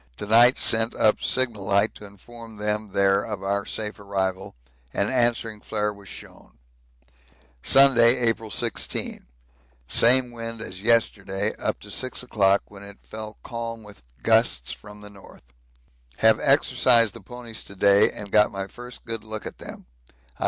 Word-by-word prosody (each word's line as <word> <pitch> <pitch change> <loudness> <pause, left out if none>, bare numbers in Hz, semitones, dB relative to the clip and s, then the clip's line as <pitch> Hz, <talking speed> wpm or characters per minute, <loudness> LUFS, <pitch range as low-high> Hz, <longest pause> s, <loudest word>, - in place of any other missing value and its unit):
To - - -6
night 120 +4 +5
sent 115 +1 +2
up 110 - +2
signal 120 -6 0
light 100 +2 +1
to 105 - -12
inform 115 +3 -14
them 105 +1 -3
there 100 0 +2
of 105 -3 -6
our 100 +1 -2
safe 105 -1 -5
arrival 95 -4 -3 0.4
an 100 - 0
answering 120 -4 0
flare 105 -1 -2
was 100 -1 -16
shown. - - -14 1.0
Sunday, 130 - +5
April 115 -2 0
16. - - -3 0.6
Same 125 - +4
wind 115 -1 -6
as 95 -3 -7
yesterday 105 -3 +1
up - - -3
to - - -10
6 130 -1 -2
o'clock, 100 -5 +1
when 100 -1 -14
it 100 0 -11
fell 110 0 -8
calm 115 -1 -6
with 105 - -15 0.2
gusts 60 +1 +1
from 105 0 -11
the 105 - -12
north. 100 -8 -17 0.7
Have - - +4
exercised 115 -4 +3
the - - -12
ponies 120 -3 -9
to 100 - -12
day 100 +2 +4
and 100 -1 -8
got 105 0 +4
my 95 0 -4
first 120 +4 -12
good 115 -2 -5
look 110 0 -7
at - - -8
them. - - -10
105 Hz, 155 wpm, -24 LUFS, 100-115 Hz, 1.0 s, night